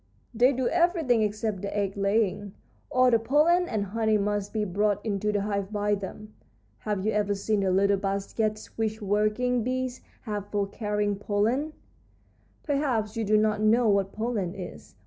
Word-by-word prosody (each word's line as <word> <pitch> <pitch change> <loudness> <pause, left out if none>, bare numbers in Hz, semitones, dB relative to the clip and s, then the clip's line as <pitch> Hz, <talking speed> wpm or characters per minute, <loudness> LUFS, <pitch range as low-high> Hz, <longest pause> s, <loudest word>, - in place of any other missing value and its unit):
"They 245 +3 +4
do 260 -2 -1
everything 335 - +2
except 210 -2 -1
the 200 +1 -4
egg 195 -1 -1
laying. 200 -1 0 0.3
All 255 0 +4
the 230 - +4
pollen 315 +9 +3
and 210 -2 -1
honey 220 +2 +1
must 205 0 -1
be 215 -1 -1
brought 205 +2 +1
into 210 -1 0
the 205 -1 0
hive 200 -1 -2
by 205 0 0
them. 205 +2 -6 0.5
Have 205 -2 -3
you 215 - +2
ever 205 -1 0
seen 210 +1 0
the 195 -1 +1
little 200 +2 +3
baskets 200 +2 -2
which 220 -1 -1
working 215 +4 +1
bees 255 +1 -2 0.2
have 210 -3 -4
for 205 -1 0
carrying 205 0 -2
pollen? 220 +9 0 0.9
Perhaps 265 -8 -1
you 230 - -1
do 215 +1 +3
not 215 0 +1
know 225 +2 +4
what 200 -1 +2
pollen 210 -5 -2
is. 75 - -9
210 Hz, 165 wpm, -27 LUFS, 200-230 Hz, 0.9 s, They